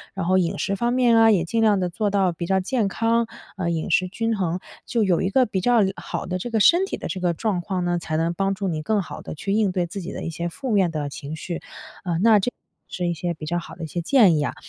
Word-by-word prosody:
然 195 - -2
后 185 +2 +3
饮 170 -2 0
食 200 - 0
方 235 +4 0
面 245 -2 +4
啊， 225 0 +6
也 185 -5 +3
尽 225 +7 0
量 210 -3 +4
地 180 -1 -1
做 205 +4 -1
到 195 -2 +2
比 170 +1 -5
较 190 +1 +2
健 215 +3 0
康， 230 +3 +1 0.3
呃， 180 -3 -1
饮 160 -2 -2
食 185 +3 +3
均 225 +4 -1
衡， 180 -2 -1 0.3
就 230 -2 +1
有 185 -4 +2
一 190 - 0
个 255 +5 +4
比 195 -4 -2
较 240 +4 +4 0.2
好 - - -5
的 180 0 -2
这 240 - -4
个 225 - +1
身 345 - +5
体 - - -4
的 - - -5
这 190 - -4
个 175 -1 +1
状 200 +1 -1
况 185 0 -2
呢， 175 0 +1
才 155 -2 -3
能 165 +1 0
帮 195 +2 0
助 195 0 -3
你 160 -4 -2
更 210 +6 +1
好 180 - -8
地 - - -7
去 195 +6 -4
应 210 -2 +2
对 180 -1 0
自 195 +3 -6
己 180 - -6
的 - - -6
一 - - -3
些 170 +1 -3
负 260 +8 -5
面 190 -5 +3
的 150 -3 -3
情 140 +2 -7
绪。 170 +2 -5 0.4
呃， 175 -3 -1
那 220 -1 +6
这 225 +6 -1 0.4
是 180 -2 -3
一 175 - 0
些 175 +1 -3
比 155 -1 -8
较 175 +3 -1
好 170 - -10
的 170 - -8
一 - - -4
些 170 +3 -3
建 195 - +5
议 145 - 0
啊。 - - -3
185 Hz, 310 characters per minute, -23 LUFS, 170-220 Hz, 0.4 s, 啊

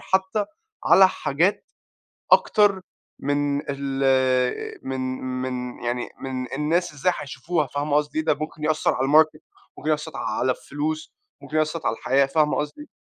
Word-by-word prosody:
حتى 190 +2 0 0.4
على 190 0 +7
حاجات 175 +4 0 0.7
أكتر 205 -3 +5 0.4
من 145 0 0
ال 135 -2 +1
من 130 0 -2 0.4
من 125 -1 -4
يعني 120 +1 -2
من 130 -2 -4
الناس 160 +5 0
إزاي 150 +5 +1
هيشوفوها 150 +3 -2
فاهمة 145 +2 -1
قصدي 150 +1 0
إيه؟ 155 - 0
ده 155 - +3
ممكن 155 +1 -6
يأثر 155 0 +2
على 130 - 0
الماركت، 155 +2 +4 0.4
ممكن 155 - -2
يأثر 155 +1 -2
على 130 - -1
الفلوس، 155 +4 -4 0.3
ممكن 155 - -5
يأثر 155 +1 0
على - - +2
الحياة 135 +4 +2
فاهمة 150 +2 +2
قصدي؟ 150 - -5
150 Hz, 145 wpm, -24 LUFS, 135-155 Hz, 0.7 s, على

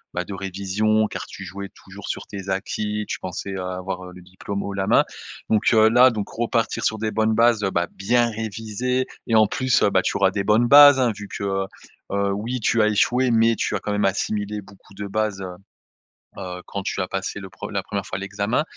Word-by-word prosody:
bah, 90 - -1
de 100 - -7
révision, 100 +3 0
car - - -6
tu 95 - -9
jouais 100 +2 -7
toujours - - -12
sur - - -4
tes 95 -1 -8
acquis, 105 +2 -2
tu - - -4
pensais, 95 +2 -5
heu, 95 - -4
avoir, 90 0 -4
heu, 90 - -10
le 90 - -12
diplôme 95 +2 -5
haut 100 - -4
la 95 0 -2
main, - - +5 0.5
donc 110 -1 +2
heu, 110 -1 +6
là 125 +3 +6
donc, 105 -4 -4
repartir 115 -1 -1
sur 110 - +1
des 110 0 -2
bonnes 110 0 +1
bases, 115 -1 +4
heu, 95 - +2
bah, 85 -2 0
bien 120 +4 +1
réviser 110 +3 -2 0.2
et 115 - +2
en 110 -1 +7
plus, 130 +4 +1
heu, 100 - +3
bah, 95 - +3
tu - - -1
auras 95 -1 +3
des 100 0 -2
bonnes 110 +4 +3
bases 145 +1 +9
hein, 125 -3 +3
vu 105 0 -8
que, - - -6
heu, 95 -1 -1 0.5
heu, 100 0 +1
oui 115 +6 -3
tu 115 0 +2
as 105 - +4
échoué, 125 +4 +2
mais 115 0 +4
tu - - -1
as - - -1
quand 105 - -4
même 105 0 +1
assimilé 105 +1 -1
beaucoup 100 0 -18
de 100 - -5
base, 105 -1 -2
heu, 90 - -5 0.9
heu, 90 -1 -6
quand 100 - -5
tu 100 - -2
as 95 - -2
passé 95 +1 -3
le 95 - -9
pre - - -8
la 100 -2 -2
1re 100 0 -4
fois 95 - -4
l'examen, 100 +7 -1
105 Hz, 235 wpm, -23 LUFS, 95-110 Hz, 0.9 s, bases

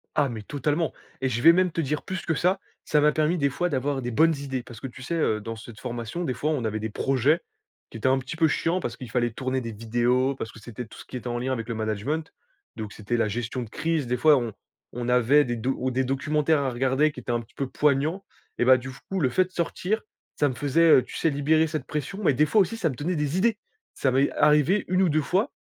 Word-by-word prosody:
Ah 145 -2 +3
mais 115 -3 -5
totalement 145 +7 -1 0.3
et 130 - +1
je 120 -1 -1
vais 165 +5 +8
même 180 0 +2
te 165 - -1
dire 150 0 -2
plus 185 -2 -5
que 165 - +1
ça, 180 +5 +1 0.3
ça 150 - +3
m'a 150 +1 +5
permis, 155 +3 +1
des 140 -3 +2
fois, 175 +7 -1
d'avoir 140 -1 -1
des 120 - -3
bonnes 160 +7 +4
idées. 135 -3 -4
Parce 120 -2 -11
que 135 - -5
tu 125 +1 -12
sais, 155 - -4
heu, 110 -10 +1
dans 115 +2 -5
cette 110 0 -11
formation, 120 +6 -4
des 130 - -1
fois, 150 - -2
on 145 -6 -1
avait 110 -1 -2
des 110 +1 -3
projets 135 - +1 0.5
qui - - -9
étaient 115 - -1
un 130 +1 +4
petit 130 +4 -6
peu 160 - +4
chiants, 165 +4 0
parce 120 -9 -4
qu'il 125 - -8
fallait 120 -2 +1
tourner 130 +3 -2
des 115 -2 -5
vidéos 120 +4 +1
parce 110 - -6
que - - -13
c'était 120 +2 -7
tout - - -14
ce - - -10
qui 125 - -6
était 125 - -7
en 120 0 -2
lien 130 +2 -2
avec 115 -3 -4
le 115 - -2
management. 110 +9 -2 0.5
Donc, 110 -2 -6
c'était 110 +3 -3
la 115 - +2
gestion 120 +4 -3
de 115 - -10
crise. 155 +1 -1
Des 125 +1 0
fois, 150 +3 +6
on 120 -4 -2 0.4
on 120 0 -4
avait 125 +4 +5
des 120 - -2
do 125 +4 -1
ou 130 0 -1
des 130 +1 +1
documentaires 150 +4 +1
à 135 -2 -1
regarder 135 +5 +2
qui 135 - -9
étaient 120 - -4
un 120 0 0
petit 115 0 -18
peu 135 - -2
poignants. 150 +7 +1 0.3
Et 120 - +2
bah, 130 0 +7
du 130 +1 -7
f 135 +1 -10
coup, 195 - 0
le 135 -6 +2
fait 185 +9 +2
de 185 - -18
sortir, 185 +5 -1 0.3
ça 145 - +2
me 130 - -5
faisait, 145 +6 +3
heu, 130 - +7
tu - - -11
sais, 165 - +1
libérer 155 +3 +2
cette 155 -4 -4
pression. 155 +6 -4
Mais 155 - +4
des 150 +4 +3
fois 215 - +4
aussi, 195 +4 0
ça 180 -8 +1
me 135 - -5
donnait 165 +8 -2
des 150 +2 -1
idées. 220 +2 +2 0.4
Ça 135 - 0
m'est 135 +2 +2
arrivé 150 +7 +3
1 185 +1 +2
ou 180 - +3
2 155 0 +2
fois, 185 +8 0
135 Hz, 275 wpm, -26 LUFS, 120-155 Hz, 0.5 s, vais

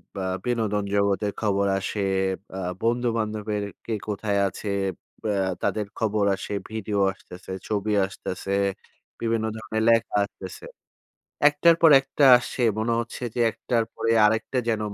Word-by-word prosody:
ব - - -8 0.3
বিনোদন 110 -4 0
জগতের 100 0 +1
খবর 100 -2 +1
আসে, 100 +1 -2 0.5
অ্যা 95 - -4 0.2
বন্ধু-বান্ধবের 110 -3 -1 0.2
কে 115 - -2
কোথায় 100 0 -1
আছে, 100 +2 -5 0.5
অ্যা 100 -3 +1
তাদের 105 -2 0
খবর 105 -2 +1
আসে, 100 - -6 0.2
ভিডিও 105 -2 -2
আসতেছে, 90 0 -12 0.2
ছবি 105 0 -1
আসতেছে, 95 0 -4 0.7
বিভিন্ন 115 -1 0
ধরনের 110 0 -2
লেখা 115 -2 +2
আসতেছে। 95 -2 -10 0.8
একটার 165 +3 +4
পর 165 - +8
একটা 135 +1 0
আসছে। 125 +1 -4 0.2
মনে 115 +2 0
হচ্ছে 120 +1 -7
যে, 120 - -2
একটার 115 0 -1
পরে 115 - 0
আরেকটা 110 +4 0
যেন 110 -2 +1
110 Hz, 135 wpm, -25 LUFS, 100-115 Hz, 0.8 s, পর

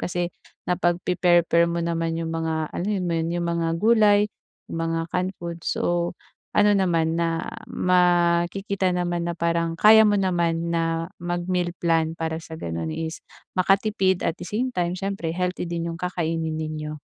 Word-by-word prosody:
kasi 175 -1 -2 0.3
napag-pe-pair-pair 175 -1 +2
mo 170 0 -1
naman 165 -1 -1
yung 165 0 -3
mga 160 -1 -2
alam 180 - -3 0.2
mo 175 - -1
'yun 165 0 0
yung 175 - -1
mga 165 -1 0
gulay, 210 0 +5 0.5
yung - - -3
mga 165 0 0
canned 185 +1 -1
food 170 -1 -6
so, 175 +1 -1 0.4
ano 210 0 +6
naman, 165 -4 +2
ah, 165 0 -1 0.3
makikita 180 +2 +2
naman 175 -1 -1
na 170 - -3
parang 170 0 0
kaya 220 +3 +8
mo 210 -1 +4
naman 170 -3 0
na 165 0 0 0.2
mag-meal 175 0 -1
plan 165 -1 +1
para 160 0 -2
sa 160 0 -9
gano'n 80 - -4
is 160 - -4 0.3
makatipid 190 0 +2
at 165 - 0
the 180 - -6
same 250 +6 -1
time 175 0 -1
siyempre 195 -3 -3
healthy 180 +1 -2
din 170 0 -3
yung 165 - -9
kakainin 165 -3 -2
ninyo. 155 -1 -4
170 Hz, 160 wpm, -24 LUFS, 165-180 Hz, 0.5 s, kaya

